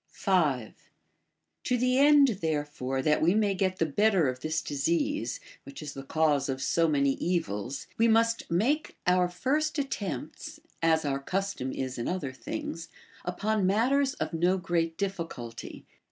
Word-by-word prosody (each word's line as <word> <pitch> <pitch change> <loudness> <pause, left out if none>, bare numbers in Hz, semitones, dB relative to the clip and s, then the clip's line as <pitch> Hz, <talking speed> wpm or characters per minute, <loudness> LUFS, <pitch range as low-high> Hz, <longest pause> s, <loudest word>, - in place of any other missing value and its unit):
5. 150 - 0 0.9
To 250 - +2
the 255 +2 +2
end 280 -7 +5
therefore 145 -4 -2
that 150 +1 +2
we 175 +5 +4
may 210 -2 +2
get 185 -1 0
the 165 - +2
better 190 +1 +3
of 130 0 -5
this 155 +3 -2
disease, 280 - -1 0.2
which 280 - -10
is 145 -1 -6
the 135 - -7
cause 145 -1 +1
of 130 0 -2
so 165 +5 +2
many 140 -3 +2
evils, 140 - -2
we 230 - +5
must 230 0 +2
make 250 - 0
our 180 0 +3
first 295 - 0
attempts 200 - -4 0.2
(as 160 -1 +3
our 135 -1 0
custom 185 -3 -2
is 130 -2 -4
in 120 - -2
other 175 -8 -3
things) 165 +5 -6 0.4
upon 200 +2 0
matters 265 +7 +2
of - - -3
no 175 +3 +2
great 165 -3 -1
difficulty. 165 -12 -5
175 Hz, 155 wpm, -28 LUFS, 145-220 Hz, 0.9 s, end